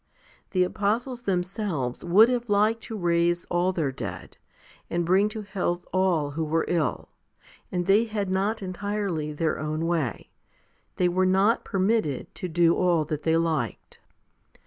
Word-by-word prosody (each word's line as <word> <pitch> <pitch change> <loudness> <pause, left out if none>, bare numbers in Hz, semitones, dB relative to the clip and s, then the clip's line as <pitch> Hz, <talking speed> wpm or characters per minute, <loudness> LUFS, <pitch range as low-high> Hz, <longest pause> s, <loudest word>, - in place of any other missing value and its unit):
The 185 -1 +2
apostles 220 +6 -1
them 185 -6 0
selves 180 - -3
would 195 +6 +6
have 240 -2 -1
liked 215 +3 +2
to 220 - -6
raise 170 -1 +1
all 175 +1 +2
their 160 -7 -1
dead, - - -7 0.5
and 170 0 -1
bring 190 +4 +3
to 215 0 -6
health 185 -3 -2
all 180 -6 +1
who 160 +3 -2
were 160 +1 0
ill, 165 -3 -1 0.6
and 175 -1 -1
they 200 +5 +4
had 210 -3 -3
not 195 +3 -1
entirely 190 -4 -3
their 155 +1 -1
own 155 +1 -2
way: 160 -9 -2 0.6
they 180 - +2
were 185 +1 +2
not 195 +5 +3
permitted 190 - 0
to 185 - -5
do 170 0 +3
all 175 -4 +2
that 150 0 -3
they 165 0 +2
liked. 160 -8 -2
180 Hz, 155 wpm, -26 LUFS, 165-205 Hz, 0.6 s, would